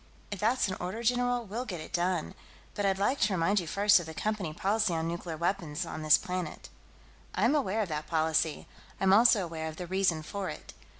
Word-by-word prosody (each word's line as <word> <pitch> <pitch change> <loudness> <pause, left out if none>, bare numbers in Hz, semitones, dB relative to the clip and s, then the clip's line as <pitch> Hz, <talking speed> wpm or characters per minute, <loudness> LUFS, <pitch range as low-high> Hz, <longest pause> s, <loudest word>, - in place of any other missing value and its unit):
"If 205 - -4
that's 230 +4 +2
an 190 - -3
order, 190 +6 -4
general, 245 0 +1
we'll 220 +5 -4
get 190 -9 -6
it 155 - -10
done. 175 -2 0 0.4
But 205 -1 0
I'd 190 -1 +1
like 230 +8 +1
to 205 -1 +2
remind 190 +4 +2
you, 175 - -5
first, 205 +3 +4
of 170 - -7
the 160 - -8
Company 210 -5 -2
policy 195 +2 0
on 160 0 -1
nuclear 170 -1 -4
weapons 170 -3 -2
on 155 - -6
this 155 -1 +6
planet." 180 -3 -5 0.7
"I'm - - +3
aware 220 -7 +1
of 195 - -6
that 150 -1 -4
policy. 160 -1 0 0.3
I'm 190 0 +4
also 220 -1 +6
aware 160 -2 -5
of 160 - -6
the 180 - -6
reason 180 -3 +1
for 200 +3 -4
it. - - -9
185 Hz, 215 wpm, -30 LUFS, 165-210 Hz, 0.7 s, this